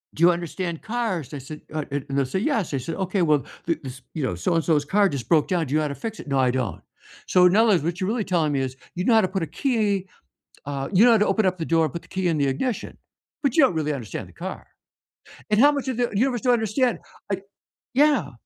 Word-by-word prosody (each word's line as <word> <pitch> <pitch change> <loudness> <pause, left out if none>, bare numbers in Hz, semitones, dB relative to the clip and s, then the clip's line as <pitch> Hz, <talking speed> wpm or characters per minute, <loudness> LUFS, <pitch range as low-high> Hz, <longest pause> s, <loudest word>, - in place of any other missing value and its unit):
"Do - - -6
you 175 - +8
understand 170 0 -4
cars?" 220 - -3
I - - -4
said, 145 +3 -9
uh, 155 -1 -1
and 140 -1 -2
they'll 140 0 +1
say 130 +9 -2
"Yes." 220 - 0
I - - +1
said, 150 +6 -4
"Okay, 190 0 -1
well, 150 -5 +3 0.2
this, 135 -6 -4
you 155 - -3
know, 125 - 0
so 90 - 0
and 165 - +2
so's 150 -3 +2
car 200 +5 +3
just 130 -7 -5
broke 155 0 +3
down. 175 -4 0
Do 135 - -4
you 155 - +3
know - - 0
how 150 - 0
to 140 - -5
fix 220 -1 -7
it?" - - -13
"No, 135 -1 +1
I 130 -1 +3
don't." 125 -4 -2 0.5
"So 180 0 +5
in 180 +2 +5
other 225 0 +5
words, 175 -7 +3
what 170 +2 -2
you're 185 - -1
really 225 +1 0
telling 165 -6 +1
me 135 - +1
is, 130 0 -4 0.2
you 180 - -2
know 235 - +3
how 220 - +6
to 185 - +1
put 190 -1 -2
a - - -3
key, 210 -8 +1 0.6
uh, 140 -1 -4
you 205 +4 +6
know 245 - +7
how 225 - +5
to 210 - +3
open 200 +2 +2
up 185 -1 0
the 160 - -2
door 165 0 +3
and 155 - -4
put 170 - -5
the - - -20
key 190 -1 +1
in 165 -3 +1
the 140 - +2
ignition, 215 - -2 0.5
but 275 -4 +1
you 315 - +6
don't 260 - +3
really 150 -1 0
understand 120 -9 -6
the - - -17
car," - - -7 0.9
and 210 +1 +3
how 290 +3 +7
much 285 -2 -3
of 255 -3 -2
the 245 -1 +1
universe 245 +3 +1
do 255 - -3
you 245 - +6
understand, 235 +2 +1 0.3
like 195 -1 -2 0.5
Yeah. 270 - +3
175 Hz, 280 wpm, -24 LUFS, 145-220 Hz, 0.9 s, you